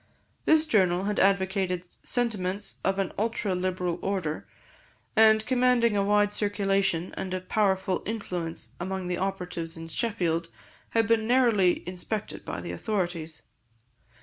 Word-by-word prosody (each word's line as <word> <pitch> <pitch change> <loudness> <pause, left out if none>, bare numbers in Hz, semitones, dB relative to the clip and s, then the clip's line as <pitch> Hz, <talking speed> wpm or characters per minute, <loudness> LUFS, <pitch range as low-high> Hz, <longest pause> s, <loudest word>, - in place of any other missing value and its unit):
This 315 0 +5
journal 185 - +3
had 205 +1 -1
advocated 190 -2 +2 0.2
sentiments 205 -5 -1
of 195 0 +1
an 195 -2 -1
ultra 220 -2 0
liberal 180 -1 -1
order, 185 -6 -2 0.7
and 220 0 +6
commanding 250 -3 +3
a 200 - +2
wide 205 0 +3
circulation 195 -4 0
and 185 -1 -3
a - - -1
powerful 190 -1 +1
influence 180 -7 -4
among 190 0 -3
the 180 - -1
operatives 180 -4 -3
in 165 0 -7
Sheffield, 170 -4 -1 0.5
had 225 - +4
been 225 -1 +2
narrowly 230 -8 +3
inspected 185 +4 -4
by - - -5
the - - -5
authorities. 175 -7 -3
195 Hz, 130 wpm, -27 LUFS, 180-215 Hz, 0.7 s, and